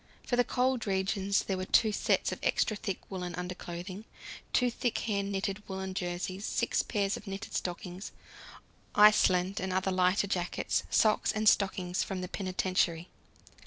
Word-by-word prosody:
For 245 - 0
the 245 - +4
cold 255 -2 0
regions 195 +1 +1
there 190 - -2
were 185 - -3
two 220 +3 +4
sets - - +1
of - - -5
extra 215 - +1
thick 195 -2 -3
woollen 180 -2 -4
underclothing, 180 +2 -6 0.5
two 250 -1 +3
thick 235 0 -1
hand 200 -2 -1
knitted 195 +1 -2
woollen 190 0 -4
jerseys, 185 +1 -3
six 235 - +1
pairs 200 -3 -1
of 210 - -12
knitted 195 0 -6
stockings, 180 +1 -4 0.8
Iceland 200 -2 +5
and 190 0 -2
other 190 +1 0
lighter 185 +2 +3
jackets, 180 -3 -1
socks 215 -1 +3
and 215 0 -1
stockings 185 -3 +2
from 190 -2 -3
the 180 - -4
penitentiary. 185 -3 -1
190 Hz, 155 wpm, -30 LUFS, 185-210 Hz, 0.8 s, Iceland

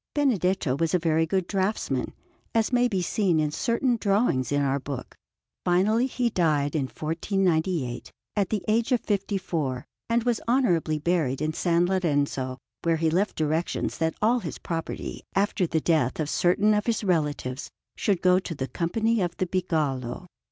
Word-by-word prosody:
Benedetto 190 - +1
was 165 +3 +1
a - - +5
very 160 -1 +1
good 190 +2 0
draughtsman, 195 +3 -1 0.4
as 225 +2 +2
may 245 0 +4
be 190 -6 -1
seen 180 -3 +1
in 150 -1 +1
certain 235 - +1
drawings 195 - +1
in 145 - +2
our 140 0 +1
book. 130 -2 -7 0.5
Finally 210 +8 +3
he 245 -2 -1
died 150 -6 +1
in 145 -4 +1
1498, 165 - -1 0.2
at 200 -3 +1
the 210 -4 -1
age 230 +4 +1
of 245 - +3
fifty 200 -1 -1
four, 150 -9 -3 0.2
and 230 0 +2
was 240 -1 0
honourably 180 - +2
buried 150 -5 0
in 155 +1 -1
S. 180 - -4
Lorenzo; 165 -7 +1 0.3
and 165 -1 +2
he 160 -1 +2
left 190 +6 +1
directions 155 +2 -1
that 160 0 0
all 240 +3 +4
his - - -6
property, 165 -1 -5
after 195 -2 +1
the 160 - +1
death 155 -6 +1
of 155 -1 -1
certain 200 +4 +3
of 210 +1 0
his 225 -2 0
relatives, 150 -7 -1 0.3
should 195 -4 0
go 180 0 +5
to 180 -3 -6
the 130 -2 -3
Company 220 +8 0
of 175 -1 -2
the 185 - 0
Bigallo. 155 -6 -1
175 Hz, 170 wpm, -26 LUFS, 155-205 Hz, 0.5 s, a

